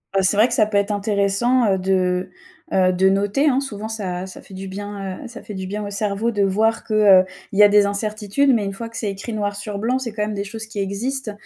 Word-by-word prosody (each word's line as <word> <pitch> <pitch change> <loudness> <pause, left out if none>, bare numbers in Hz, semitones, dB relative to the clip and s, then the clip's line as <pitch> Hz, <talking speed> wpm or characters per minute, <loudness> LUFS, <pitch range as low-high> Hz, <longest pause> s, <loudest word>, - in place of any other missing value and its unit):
Heu, 195 - +4
c'est 195 +2 +2
vrai 225 +3 +6
que 240 - -3
ça 220 -3 +4
peut 210 -1 -1
être 200 +1 +1
intéressant 205 +2 +2
de, 185 0 0 0.4
heu, 185 -1 +3
de 190 +1 +3
noter 205 +9 +1
hein, 265 0 +2
souvent 220 -6 -5
ça 190 -5 -3
ça 190 - -10
fait - - -15
du 190 +1 -7
bien, 195 -1 -6
heu, - - -7
ça 240 +1 -10
fait 210 - -9
du 190 -1 -5
bien 205 +2 -4
au - - -5
cerveau 205 +2 -1
de 205 -3 +1
voir 215 +4 +1
que, 220 - -4
heu, 200 -3 +6 0.3
il 200 - -2
y - - +9
a - - +9
des 205 0 +5
incertitudes, 215 +6 0
mais 225 -3 +1
une 195 - -3
fois 230 +3 -6
que 230 - -9
c'est 210 - -2
écrit 195 +4 -6
noir 205 -1 -2
sur 205 0 -5
blanc, 250 +5 0
c'est 235 -4 -5
quand 210 - -4
même 210 0 -3
des 200 - -3
choses 220 +2 -5
qui 215 -1 -7
existent. 220 +6 -2
205 Hz, 265 wpm, -21 LUFS, 195-220 Hz, 0.4 s, y